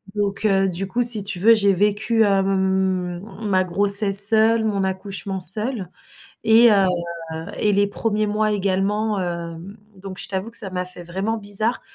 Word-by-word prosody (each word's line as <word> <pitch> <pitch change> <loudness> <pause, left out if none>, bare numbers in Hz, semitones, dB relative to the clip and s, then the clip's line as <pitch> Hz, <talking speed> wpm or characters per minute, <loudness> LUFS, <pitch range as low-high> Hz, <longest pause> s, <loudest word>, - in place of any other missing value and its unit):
donc 205 0 -4
heu, 195 -2 +1
du 185 +2 -3
coup, 245 +5 -2
si 225 -4 +4
tu 185 -3 +2
veux, 225 +4 +4
j'ai 200 -3 +1
vécu, 210 +4 0
hem, 190 -2 -1 0.3
ma 190 -2 0
grossesse 200 +2 +5
seule, 225 +1 +2
mon 200 -3 -2
accouchement 190 0 -6
seule 205 - +4 0.5
et 230 +1 +4
heu 195 -2 +2 0.7
et 210 - 0
les 200 0 0
1ers 215 +1 -3
mois 215 +1 -2
également, 200 +2 -2
hem, 170 +2 -8 0.2
donc 190 0 -11
je - - -6
t'avoue 190 +3 -5
que - - +3
ça 195 - -1
m'a 180 0 -4
fait 180 -1 -10
vraiment 195 +6 -5
bizarre, 215 +3 -3
200 Hz, 165 wpm, -19 LUFS, 190-215 Hz, 0.7 s, grossesse